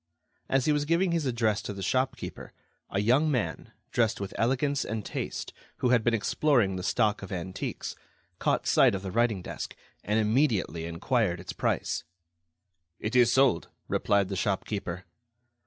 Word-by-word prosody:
As 135 Hz, -1 st, +2 dB
he 155 Hz, -, +3 dB
was 145 Hz, 0 st, +1 dB
giving 170 Hz, +3 st, +2 dB
his 165 Hz, -4 st, 0 dB
address 115 Hz, -4 st, +1 dB
to 105 Hz, -, -5 dB
the 100 Hz, -1 st, -6 dB
shopkeeper, 130 Hz, +6 st, -2 dB, 0.4 s
a -, -, -3 dB
young 130 Hz, +9 st, +3 dB
man, 125 Hz, -7 st, -2 dB, 0.2 s
dressed 115 Hz, -3 st, +1 dB
with 100 Hz, +1 st, -5 dB
elegance 135 Hz, +4 st, +1 dB
and 110 Hz, -1 st, -4 dB
taste, -, -, -4 dB, 0.2 s
who 125 Hz, -, +1 dB
had 120 Hz, -3 st, +4 dB
been 120 Hz, 0 st, +3 dB
exploring 115 Hz, -2 st, +2 dB
the 90 Hz, -, -3 dB
stock 105 Hz, +2 st, +1 dB
of 95 Hz, -, -8 dB
antiques, 95 Hz, 0 st, -4 dB, 0.4 s
caught -, -, +1 dB
sight -, -, +5 dB
of 95 Hz, -, -5 dB
the 95 Hz, -, -4 dB
writing 115 Hz, -4 st, +1 dB
desk, -, -, -6 dB, 0.3 s
and 105 Hz, +3 st, +1 dB
immediately 105 Hz, -, +1 dB
enquired 85 Hz, +2 st, 0 dB
its 90 Hz, -1 st, -7 dB
price. 80 Hz, -, -1 dB, 1.0 s
"It 110 Hz, +3 st, -3 dB
is 120 Hz, -1 st, +6 dB
sold," 130 Hz, -9 st, +3 dB, 0.2 s
replied 100 Hz, -2 st, +2 dB
the 100 Hz, -, -2 dB
shopkeeper. 95 Hz, -2 st, -2 dB
110 Hz, 160 wpm, -28 LUFS, 95-130 Hz, 1.0 s, is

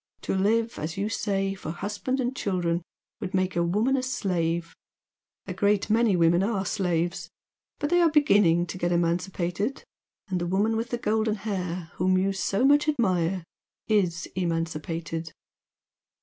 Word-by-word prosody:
To -, -, -2 dB
live, 225 Hz, +4 st, +1 dB
as 160 Hz, +3 st, -4 dB
you 200 Hz, +2 st, -1 dB
say, 195 Hz, -3 st, -1 dB
for 190 Hz, -5 st, -7 dB
husband 205 Hz, +10 st, -3 dB
and 255 Hz, +1 st, -1 dB
children 175 Hz, -6 st, -1 dB, 0.4 s
would 190 Hz, -1 st, -4 dB
make 185 Hz, 0 st, 0 dB
a 170 Hz, -, +2 dB
woman 210 Hz, +10 st, +2 dB
a 265 Hz, -, +1 dB
slave 170 Hz, -9 st, -1 dB, 0.7 s
a 185 Hz, -, -5 dB
great 205 Hz, +2 st, +1 dB
many 225 Hz, -3 st, +4 dB
women 170 Hz, +1 st, +4 dB
are 200 Hz, -1 st, 0 dB
slaves 175 Hz, -4 st, -1 dB, 0.5 s
but 290 Hz, +1 st, -2 dB
they 350 Hz, 0 st, +5 dB
are 335 Hz, -, +5 dB
beginning 200 Hz, -, +4 dB
to 180 Hz, +1 st, -7 dB
get 175 Hz, 0 st, 0 dB
emancipated 175 Hz, +6 st, -1 dB, 0.4 s
the 180 Hz, -3 st, -2 dB
woman 205 Hz, +5 st, +1 dB
with 230 Hz, +2 st, -2 dB
the 240 Hz, -, -1 dB
gold 220 Hz, -1 st, 0 dB
hair, 185 Hz, -5 st, -3 dB
whom 185 Hz, +1 st, +3 dB
you 195 Hz, +1 st, +1 dB
so 195 Hz, +4 st, 0 dB
much 290 Hz, +2 st, +5 dB
admire, 185 Hz, -, +1 dB, 0.4 s
is 180 Hz, -6 st, +1 dB
emancipated." 165 Hz, -1 st, -3 dB
190 Hz, 150 wpm, -26 LUFS, 175-220 Hz, 0.7 s, they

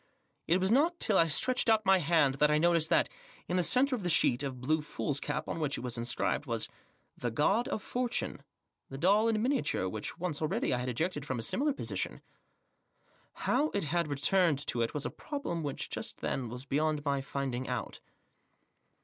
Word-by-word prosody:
It 175 Hz, +3 st, +3 dB
was 190 Hz, +2 st, +1 dB
not 320 Hz, +7 st, +3 dB
till 215 Hz, -, +2 dB
I 165 Hz, -3 st, +5 dB
stretched 250 Hz, +10 st, +2 dB
out 220 Hz, -1 st, +3 dB
my 190 Hz, 0 st, +5 dB
hand 155 Hz, -6 st, +2 dB
that 150 Hz, -, +5 dB
I 150 Hz, -, +3 dB
noticed 165 Hz, 0 st, +3 dB
that, -, -, +3 dB, 0.4 s
in 180 Hz, -, -1 dB
the 180 Hz, -, +3 dB
centre 255 Hz, +8 st, +3 dB
of 235 Hz, -, -6 dB
the 180 Hz, -, -2 dB
sheet 130 Hz, -6 st, +4 dB
of 135 Hz, -3 st, -4 dB
blue 155 Hz, +5 st, +1 dB
foolscap 145 Hz, -1 st, -3 dB
on -, -, -3 dB
which 150 Hz, -3 st, -1 dB
it -, -, -5 dB
was 125 Hz, -1 st, -4 dB
inscribed, 120 Hz, 0 st, -1 dB
was— -, -, -1 dB, 0.5 s
the 120 Hz, -, -3 dB
God 195 Hz, -, +2 dB
of 210 Hz, -, -3 dB
Fortune, 245 Hz, -1 st, -2 dB, 0.5 s
the 135 Hz, -, -7 dB
doll 200 Hz, +8 st, +3 dB
in 225 Hz, -1 st, +2 dB
minia 260 Hz, +4 st, +1 dB
ture 95 Hz, -, -1 dB
which, 105 Hz, -, -5 dB
once 170 Hz, -4 st, -3 dB
already, 175 Hz, -, 0 dB
I 125 Hz, -, 0 dB
had 125 Hz, +1 st, -3 dB
ejected 150 Hz, +4 st, -2 dB
from 130 Hz, -3 st, -3 dB
a 115 Hz, -, -4 dB
similar 290 Hz, -, +1 dB
position. 275 Hz, -, -3 dB, 1.2 s
How 305 Hz, +2 st, +2 dB
it 200 Hz, -, 0 dB
had 170 Hz, +2 st, 0 dB
returned 150 Hz, +3 st, +2 dB
to 120 Hz, -, 0 dB
it 115 Hz, -, -1 dB
was 145 Hz, -, -2 dB
a -, -, -2 dB
problem 280 Hz, -, -4 dB
which, 145 Hz, -3 st, -3 dB
just -, -, -4 dB
then, 125 Hz, -3 st, -2 dB
was 125 Hz, +3 st, -7 dB
beyond 150 Hz, +1 st, 0 dB
my 140 Hz, -1 st, 0 dB
finding 135 Hz, -2 st, -3 dB
out. 125 Hz, -3 st, -4 dB
155 Hz, 200 wpm, -31 LUFS, 135-195 Hz, 1.2 s, I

